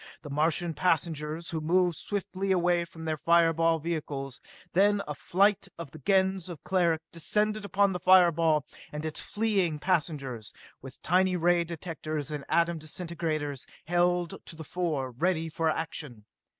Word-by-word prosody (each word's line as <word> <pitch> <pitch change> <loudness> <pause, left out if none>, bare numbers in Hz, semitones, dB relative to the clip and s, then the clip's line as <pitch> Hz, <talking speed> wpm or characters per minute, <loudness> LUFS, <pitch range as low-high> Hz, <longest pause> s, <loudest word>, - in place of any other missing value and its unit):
The 145 - -8
Martian 165 +3 +1
passengers, 160 -1 -1
who 160 -2 -2
moved 175 +2 +2
swiftly 195 +1 -3
away 175 -1 +2
from 165 -1 -10
their 155 -1 -1
fire 165 +1 +4
ball 165 0 +2
vehicles, 145 -5 -4 0.3
then 200 +2 +3
a 150 - -3
flight 195 +8 +2
of 165 -5 -7
the 155 - -11
Gens 190 +2 +1
of 170 -4 -9
Cleric 170 -4 +1
descended 210 +5 -1
upon 200 0 +2
the 180 - -3
fireball 170 -5 +5 0.3
and 150 +1 -5
its 155 - -3
fleeing 200 -7 0
passengers, 145 - -2 0.3
with 130 0 -10
tiny 185 +1 +3
ray 175 0 +3
directors 155 -3 -5
and 145 -2 -5
atom 170 -1 +2
disintegrators 155 -4 -4 0.2
held 175 +1 +1
to - - -9
the 160 - -8
fore, 155 -6 -2
ready 165 +5 0
for 160 +1 0
action. 150 -8 -5
165 Hz, 150 wpm, -29 LUFS, 155-180 Hz, 0.3 s, fireball